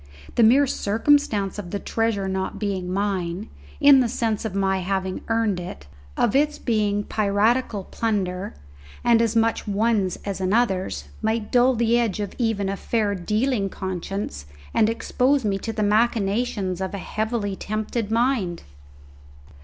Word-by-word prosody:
The -, -, +2 dB
mere 255 Hz, +6 st, +6 dB
circumstance 215 Hz, -4 st, +1 dB
of 185 Hz, -4 st, -6 dB
the 200 Hz, -, -2 dB
treasure 220 Hz, -2 st, -1 dB
not 190 Hz, 0 st, -2 dB
being 190 Hz, -4 st, -2 dB
mine, 190 Hz, 0 st, -2 dB, 0.3 s
in 285 Hz, -2 st, +7 dB
the 245 Hz, -2 st, +2 dB
sense 220 Hz, -1 st, -1 dB
of 205 Hz, -3 st, -4 dB
my 190 Hz, -1 st, +1 dB
having 190 Hz, 0 st, -2 dB
earned 225 Hz, -5 st, +1 dB
it, 175 Hz, -, -8 dB, 0.3 s
of 230 Hz, -, +2 dB
its 295 Hz, +2 st, +2 dB
being 210 Hz, -3 st, 0 dB
piratical 210 Hz, +1 st, +1 dB
plunder, 195 Hz, -3 st, -2 dB, 0.5 s
and 235 Hz, -1 st, +4 dB
as 230 Hz, -1 st, +1 dB
much 225 Hz, 0 st, +1 dB
one's 205 Hz, -2 st, +1 dB
as 200 Hz, -1 st, -3 dB
another's, 190 Hz, -1 st, 0 dB, 0.2 s
might 220 Hz, 0 st, -1 dB
dull 250 Hz, +1 st, +4 dB
the 235 Hz, +1 st, +2 dB
edge 225 Hz, -4 st, -1 dB, 0.2 s
even 225 Hz, -4 st, 0 dB
of 195 Hz, 0 st, -3 dB
a -, -, -17 dB
fair 215 Hz, -3 st, 0 dB
dealing 210 Hz, +3 st, 0 dB
conscience 185 Hz, -, -5 dB, 0.3 s
and 215 Hz, -, +3 dB
expose 255 Hz, +3 st, +1 dB
me 195 Hz, -2 st, 0 dB
to 225 Hz, -, -4 dB
the 215 Hz, -1 st, -1 dB
machinations 210 Hz, -3 st, +1 dB
of 190 Hz, +1 st, -3 dB
a -, -, -3 dB
heavily 215 Hz, 0 st, -2 dB
tempted 215 Hz, +2 st, -3 dB
mind. 225 Hz, -7 st, 0 dB
210 Hz, 150 wpm, -23 LUFS, 195-230 Hz, 0.5 s, in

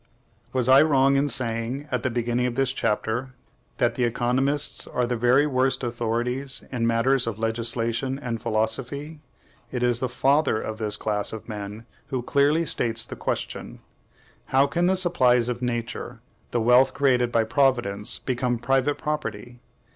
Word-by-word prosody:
Was 130 Hz, -2 st, 0 dB
I 135 Hz, +1 st, +7 dB
wrong 140 Hz, -3 st, +3 dB
in 140 Hz, +1 st, +2 dB
saying, 120 Hz, +2 st, -1 dB
at 125 Hz, -2 st, 0 dB
the 130 Hz, -, -1 dB
beginning 120 Hz, +1 st, -1 dB
of 120 Hz, -, -4 dB
this 135 Hz, -1 st, +1 dB
chapter, 115 Hz, +2 st, -2 dB, 0.4 s
that 120 Hz, -3 st, +2 dB
the 125 Hz, -, -1 dB
economists 125 Hz, +4 st, +1 dB
are 125 Hz, -, -1 dB
the 120 Hz, +1 st, -2 dB
very 125 Hz, +5 st, +3 dB
worst 130 Hz, -2 st, 0 dB
authorities 120 Hz, +3 st, -1 dB
in 120 Hz, -3 st, 0 dB
matters 115 Hz, +2 st, +2 dB
of 110 Hz, -3 st, -3 dB
legislation 115 Hz, +3 st, -1 dB
and 115 Hz, -4 st, -5 dB
philosophy? 125 Hz, +7 st, -2 dB, 0.5 s
It 125 Hz, -1 st, -2 dB
is 120 Hz, -1 st, +2 dB
the 130 Hz, -, -2 dB
FATHER 135 Hz, -1 st, +2 dB
of 110 Hz, 0 st, -6 dB
this 105 Hz, -2 st, -1 dB
class 105 Hz, -1 st, -1 dB
of 110 Hz, -, -8 dB
men 105 Hz, 0 st, -7 dB, 0.2 s
who 130 Hz, -4 st, -3 dB
clearly 145 Hz, +6 st, +2 dB
states 115 Hz, -5 st, 0 dB
the -, -, -8 dB
question, -, -, -4 dB, 0.7 s
How 135 Hz, +1 st, +3 dB
can 175 Hz, +5 st, 0 dB
the 190 Hz, +1 st, +2 dB
supplies 125 Hz, -10 st, +3 dB
of 120 Hz, 0 st, -4 dB
Nature, 120 Hz, 0 st, -4 dB, 0.3 s
the 120 Hz, -, -1 dB
wealth 125 Hz, +3 st, +4 dB
created 125 Hz, -4 st, +2 dB
by 115 Hz, -2 st, +2 dB
Providence, 110 Hz, -5 st, +1 dB
become 125 Hz, -1 st, -1 dB
private 135 Hz, +4 st, +1 dB
property? 120 Hz, -6 st, -5 dB
125 Hz, 160 wpm, -24 LUFS, 115-135 Hz, 0.7 s, I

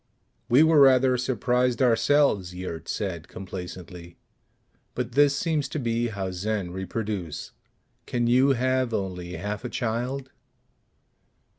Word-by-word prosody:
_" -, -, -49 dB, 0.5 s
"We 130 Hz, +6 st, +6 dB
were 160 Hz, -1 st, +5 dB
rather 130 Hz, -2 st, +6 dB
surprised 125 Hz, 0 st, 0 dB
ourselves," 115 Hz, -6 st, +3 dB
Yurt 90 Hz, -3 st, -6 dB
said 90 Hz, -5 st, -3 dB
complacently. 90 Hz, -2 st, -9 dB, 0.8 s
"But 125 Hz, -1 st, -3 dB
this 140 Hz, +2 st, +4 dB
seems 155 Hz, -3 st, -1 dB
to 155 Hz, -, -3 dB
be 120 Hz, -1 st, 0 dB
how 100 Hz, -4 st, -4 dB
Zen 95 Hz, 0 st, -3 dB
reproduce. 95 Hz, -3 st, -4 dB, 0.6 s
Can 120 Hz, -1 st, 0 dB
you 130 Hz, +3 st, +4 dB
have 130 Hz, -1 st, 0 dB
only 90 Hz, -2 st, -4 dB
half 105 Hz, +5 st, -4 dB
a 125 Hz, -, -4 dB
child?" 125 Hz, +3 st, -3 dB
115 Hz, 125 wpm, -26 LUFS, 95-130 Hz, 0.8 s, We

